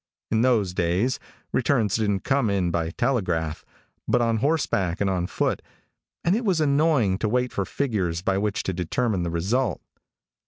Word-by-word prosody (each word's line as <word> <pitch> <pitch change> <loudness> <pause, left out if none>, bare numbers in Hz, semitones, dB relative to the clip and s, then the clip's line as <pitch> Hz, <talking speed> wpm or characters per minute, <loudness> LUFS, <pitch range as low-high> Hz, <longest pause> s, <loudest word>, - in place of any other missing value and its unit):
In 110 - +3
those 115 -7 +2
days 90 +9 0 0.3
returns 115 -6 +2
didn't 105 -3 0
come 135 -5 +1
in 95 -3 +1
by 85 -1 -1
telegraph, 85 - -1 0.4
but 125 - +3
on 115 -1 +2
horseback 110 - 0
and 100 - +1
on 90 -2 -1
foot, - - -1 0.6
and 175 +3 +3
it 235 - -1
was 190 -7 +2
annoying 140 -9 +2
to 110 - 0
wait 125 +2 0
for 100 - -1
figures 95 -12 -1
by 95 0 +1
which 105 0 -1
to 95 - -2
determine 95 +4 -1
the 85 - -1
result. 105 +10 0
105 Hz, 165 wpm, -25 LUFS, 90-130 Hz, 0.6 s, In